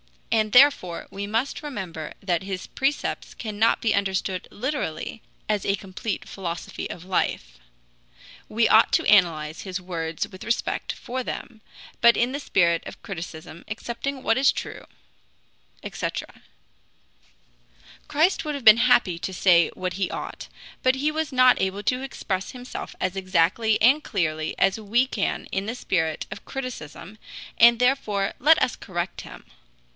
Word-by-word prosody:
And 215 -1 +2
therefore 250 -10 +4
we 200 +1 -5
must 225 +6 -1
remember 185 - -6
that 175 -4 0
his 190 -1 -5
precepts 275 +2 -2
cannot 220 0 +1
be 225 - +2
understood 190 -2 -1
literally 225 - -4 0.3
as 210 -2 0
a 195 - +1
complete 195 +2 -5
philosophy 175 -3 -5
of 175 - -8
life. - - -2 0.9
We 225 +1 +3
ought 220 +1 +5
to - - +3
analyze 165 -6 +3
his 190 -1 -4
words 165 -3 -3
with 185 - -11
respect 230 +1 -1
for 255 +2 -5
them, 230 -2 -7 0.4
but 235 0 +6
in 240 +2 +2
the 285 - -3
spirit 170 - +2
of - - -11
criticism, 165 -3 -8
accepting 250 +5 -5
what 225 - +2
is 270 +1 +5
true," - - -7 1.0
etc. - - -5 1.7
Christ 325 +3 +2
would 300 -2 -3
have 275 -4 -7
been 215 0 +10
happy 235 -8 +3
to 190 - -4
say 175 -2 +4
what 185 0 -3
he 190 0 -1
ought, - - -6 0.3
but 255 0 +3
he 290 +3 0
was 315 0 -2
not 255 -1 +5
able 190 +2 -1
to 250 +3 0
express 200 -8 -4
himself 250 0 -8
as 185 0 -1
exactly 190 +4 +2
and 270 +7 +5
clearly 155 -6 -2
as 195 +3 +2
we 225 +4 +2
can 225 -6 -2
in 195 +1 -2
the 230 - -3
spirit 160 -9 -1
of - - -8
criticism, 215 - -7 0.4
and 235 0 +8
therefore 220 -6 +1
let 310 +4 +6
us 245 - 0
correct 175 0 -4
him. - - -12
205 Hz, 150 wpm, -24 LUFS, 185-250 Hz, 1.7 s, been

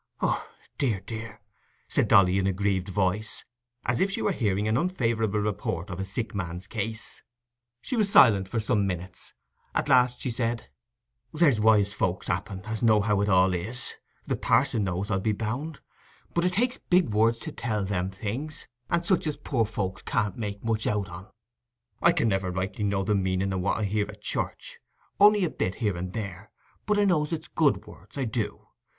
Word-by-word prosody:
"Oh, - - -1 0.3
dear, 120 -9 +1
dear," 110 +1 -7 0.5
said - - +1
Dolly 95 -1 +5
in 95 - +1
a - - +3
grieved 95 -1 0
voice, 100 +2 -1 0.4
as 120 - +1
if 195 - +3
she 195 - -2
were - - +2
hearing 105 - 0
an 110 - +2
unfavourable 115 - 0
report 100 -3 -2
of 85 - -5
a 95 - -2
sick 100 +3 -4
man's 90 -2 -4
case. 110 +2 -4 0.6
She - - -2
was 210 -4 +2
silent 100 - +6
for 115 - -1
some 105 -2 +1
minutes; 90 0 -6 0.4
at - - 0
last 125 -2 +4
she 125 - -2
said— 115 0 -2 0.6
"There's 150 -8 +3
wise 105 -2 +4
folks, 90 -3 -1
happen, 95 +2 -3
as 110 0 -3
know 110 -3 +5
how 100 -1 +1
it 100 - +1
all 95 -1 +4
is; 115 +8 -4 0.3
the - - 0
parson 115 -3 +2
knows, 95 +3 -2
I'll 95 - +2
be 110 +2 0
bound; 125 +9 -4 0.5
but 170 +1 +1
it 180 - +1
takes 245 +6 +1
big 180 -5 +2
words 115 +2 +3
to - - -6
tell 105 -4 -2
them 95 -1 -1
things, 115 +10 -5 0.2
and 170 0 +1
such 180 -3 +2
as 150 - -2
poor 130 -5 0
folks 95 -3 -3
can't 100 -2 -1
make 100 -3 -5
much 110 -1 0
out 100 -2 0
on. 90 +4 -9 0.7
I 170 - +6
can 160 -8 +1
never 95 -3 0
rightly 95 +4 -2
know 100 -1 +1
the 105 - +1
meaning 95 0 0
o' 95 - -1
what 95 +2 0
I 110 - -1
hear 105 0 0
at - - -11
church, - - -3 0.4
only 205 0 +7
a - - -1
bit 90 - -2
here 105 -6 -1
and 90 +1 -4
there, 100 -2 -6 0.4
but 210 -1 +2
I 205 - +4
know 160 -6 +2
it's 165 -1 -4
good 150 -4 +2
words—I 135 -2 -6
do. 110 -2 -3
105 Hz, 195 wpm, -27 LUFS, 95-125 Hz, 0.7 s, only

